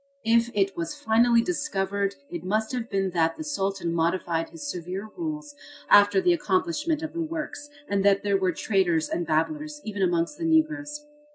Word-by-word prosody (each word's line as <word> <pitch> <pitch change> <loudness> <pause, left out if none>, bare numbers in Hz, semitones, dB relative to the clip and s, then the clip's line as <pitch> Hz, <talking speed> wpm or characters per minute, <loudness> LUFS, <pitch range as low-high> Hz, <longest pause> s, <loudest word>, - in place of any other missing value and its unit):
If 230 +1 +3
it 195 -1 +1
was 170 -1 -4
finally 230 +1 +4
discovered 200 - -1
it 175 -1 -6
must 215 +4 0
have 245 -2 -3
been 195 -2 0
that 165 -2 +1
the - - -5
Sultan 195 - -2
modified 170 0 0
his 310 -3 -8
severe 185 - -5
rules 305 -3 -5 0.4
after 205 - +7
the 360 -2 +4
accomplishment 330 -1 0
of 315 - -5
the 335 - -2
works 310 -2 -5 0.2
and 200 -1 0
that 200 0 +4
there 200 -1 +1
were 190 -1 +1
traitors 175 -4 +1
and 175 -1 -2
babblers 295 - -1
even 205 -2 -4
amongst 175 - 0
the 330 - -2
Negroes. 295 -2 +1
215 Hz, 175 wpm, -26 LUFS, 185-300 Hz, 0.4 s, after